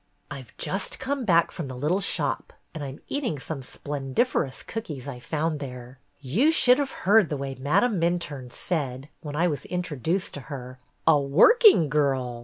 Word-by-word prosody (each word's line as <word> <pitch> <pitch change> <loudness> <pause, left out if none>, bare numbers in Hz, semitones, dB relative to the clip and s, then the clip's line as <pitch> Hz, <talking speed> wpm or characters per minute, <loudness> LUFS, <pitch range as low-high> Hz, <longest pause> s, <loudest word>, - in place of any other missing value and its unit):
"I - - -6
've - - -17
just - - -1
come 275 -1 -3
back 170 -4 +3
from 165 - -5
the 130 -1 -7
little 155 +9 +1
shop 200 - -1 0.2
and 155 -3 -6
I - - -4
'm 135 +1 -9
eating 255 - -2
some 140 +1 -6
splendiferous 140 - -2
cookies 150 - -6
I 130 -3 -6
found 155 +3 -2
there. 125 -1 -8 0.2
"You 165 - +2
should 255 -5 +5
have 280 -2 0 0.2
heard 205 -2 +5
the 150 - -2
way 135 0 -4
Madame 180 - +1
Minturne 155 -7 -2
said, 140 -5 -3
when 145 -2 -7
I 170 +3 +2
was 150 -4 -3
introduced 180 0 -2
to - - -6
her, 130 -3 -7 0.3
'A 150 -3 +5
working 175 - +6
girl 135 -4 0
150 Hz, 180 wpm, -26 LUFS, 135-185 Hz, 0.3 s, working